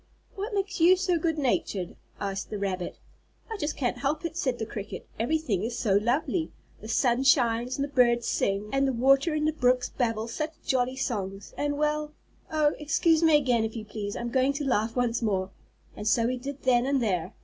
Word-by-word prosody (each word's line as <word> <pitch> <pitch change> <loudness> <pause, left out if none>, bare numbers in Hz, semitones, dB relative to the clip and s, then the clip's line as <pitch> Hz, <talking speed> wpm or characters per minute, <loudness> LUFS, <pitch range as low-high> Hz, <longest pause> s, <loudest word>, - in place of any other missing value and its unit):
"What 410 +2 -4
makes 390 -1 -2
you 350 +3 +7
so 360 -2 0
good 320 0 0
natured?" 215 - -1 0.2
asked 195 -1 -3
the 210 - -4
rabbit. 190 -3 -3 0.5
"I 445 - -3
just 295 -4 -3
can't 245 -2 -1
help 285 +5 -1
it," 335 - -4
said 260 -8 -1
the 220 - -3
cricket. 210 -2 -7
"Everything 240 - 0
is 235 +2 -3
so 205 -5 +1
lovely. 255 - +1 0.3
The 215 - -10
sun 240 +2 +2
shines, 245 -2 +3
and 280 - -1
the - - -1
birds 240 -3 +4
sing, 200 +2 -1
and 275 0 +2
the 265 - 0
water 275 +6 +3
in 305 0 0
the 310 - +1
brooks 250 -4 +2
babble 225 -3 -1
such 305 +7 -3
jolly 255 -1 +1
songs, 200 -7 -4
and 290 0 -1
well 300 0 -1 0.4
Oh, 305 -1 +3
excuse 315 +2 +2
me 320 -2 +6
again 250 -5 +2
if 220 +1 -3
you 220 -2 -5
please, 205 -1 -5
I'm 235 0 -4
going 265 +2 +2
to 285 +1 -3
laugh 225 -3 0
once 245 -1 0
more," 190 -4 -1 0.4
and 210 - -5
so 230 +2 +3
he 255 - 0
did 275 +2 -7
then 250 -1 +3
and 275 0 +2
there. 185 -8 -1
250 Hz, 205 wpm, -27 LUFS, 225-300 Hz, 0.5 s, you